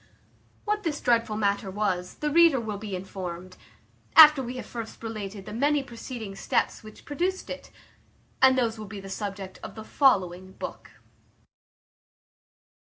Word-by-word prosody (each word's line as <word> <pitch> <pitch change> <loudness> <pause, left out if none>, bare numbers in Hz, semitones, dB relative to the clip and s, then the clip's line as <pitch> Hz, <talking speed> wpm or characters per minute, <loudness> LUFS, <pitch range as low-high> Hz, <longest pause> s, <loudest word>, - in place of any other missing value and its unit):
What 420 0 0
this 315 -6 -2
dreadful 230 -3 +1
matter 200 -2 0
was, 185 -3 -2
the 300 0 -2
reader 330 -3 +6
will 215 -3 -4
be 205 -2 -5
informed, 185 -1 -7 0.6
after 305 -3 +10
we 250 0 -5
have - - -6
first 230 -1 -8
related 210 -3 -6
the - - -8
many 285 +4 +2
preceding 235 -5 -7
steps - - 0
which 215 -1 -14
produced 360 +6 -2
it, - - -7 0.7
and 260 0 +6
those 230 -3 0
will 215 - -7
be 200 0 -7
the 195 0 -9
subject 195 -1 -5
of - - -8
the 220 - -7
following 185 -9 +2
book. - - -7
220 Hz, 150 wpm, -27 LUFS, 195-265 Hz, 0.7 s, after